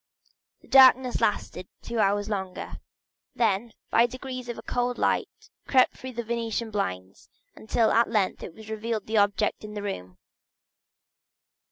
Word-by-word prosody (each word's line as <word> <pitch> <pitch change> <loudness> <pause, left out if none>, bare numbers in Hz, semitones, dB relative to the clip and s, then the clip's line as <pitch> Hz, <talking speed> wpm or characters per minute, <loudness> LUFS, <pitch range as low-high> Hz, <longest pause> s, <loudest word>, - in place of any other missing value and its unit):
The - - -20
darkness 260 0 +6
lasted 185 -3 -1 0.2
two 235 -1 -3
hours 205 0 +2
longer; 190 -3 -5 0.6
then 225 0 +1 0.2
by 235 +1 +5
degrees 255 0 -7
a 235 - -5
cold 245 0 -1
light - - +1 0.4
crept 255 -2 +4
through 260 0 -8
the 235 0 -4
Venetian 230 0 -3
blinds, 95 - -4 0.3
until 220 +1 +1
at 230 0 +3
length 210 -4 0
it 210 +5 -10
revealed 220 0 -3
the 220 0 -1
objects 205 +1 +1
in 210 0 -8
the 205 - -5
room. 90 - -6
220 Hz, 140 wpm, -26 LUFS, 205-240 Hz, 0.6 s, darkness